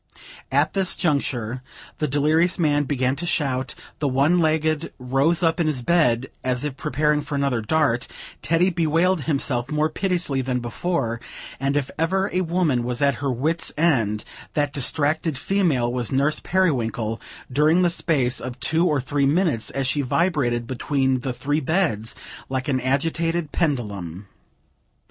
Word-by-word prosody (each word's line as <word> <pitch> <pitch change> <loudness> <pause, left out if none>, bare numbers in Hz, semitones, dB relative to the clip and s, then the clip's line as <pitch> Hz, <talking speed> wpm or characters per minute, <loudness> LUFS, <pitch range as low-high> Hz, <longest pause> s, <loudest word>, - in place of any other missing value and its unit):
At - - +2
this 190 -2 +1
juncture, 130 - -1 0.4
the 150 - +1
delirious 155 +5 +2
man 145 -4 +2
began 130 -2 0
to 175 +4 -3
shout; 135 -6 0 0.2
the 150 - 0
one 140 +7 +3
legged 155 0 +1
rose 135 +7 +1
up 165 +1 +2
in 165 - +2
his 135 -5 -1
bed, 130 -7 +3 0.2
as 125 0 0
if 145 -3 -3
preparing 150 +1 +1
for 145 - -5
another 140 -4 0
dart; 130 0 +1 0.3
Teddy 170 +3 +2
bewailed 165 -1 +1
himself 135 -4 -1
more 150 +1 +1
piteously 175 -6 0
than 125 -1 -1
before: 120 -1 -2 0.4
and 135 +2 0
if 145 -1 -2
ever 190 +4 +1
a 185 - +2
woman 165 -8 +1
was 125 0 -3
at 140 -2 +1
her 140 -2 0
wit's 155 +7 0
end, 115 -10 +1 0.3
that 145 -2 0
distracted 150 +2 0
female 150 -13 +1
was 125 -2 -1
Nurse 140 +3 +2
Periwinkle, 120 - 0 0.3
during 155 +7 +4
the 175 - +3
space 135 -8 +1
of 125 0 -6
two 165 +6 +2
or 150 -4 +2
three 140 +2 0
minutes, 150 - +1
as 135 -1 -2
she 145 +2 +1
vibrated 130 -5 0
between 130 +1 0
the 130 +1 -3
three 140 +5 -1
beds, 150 - 0 0.3
like 130 -1 -2
an 130 -3 0
agitated 165 +4 0
pendulum. 105 - -2
145 Hz, 155 wpm, -23 LUFS, 125-165 Hz, 0.4 s, during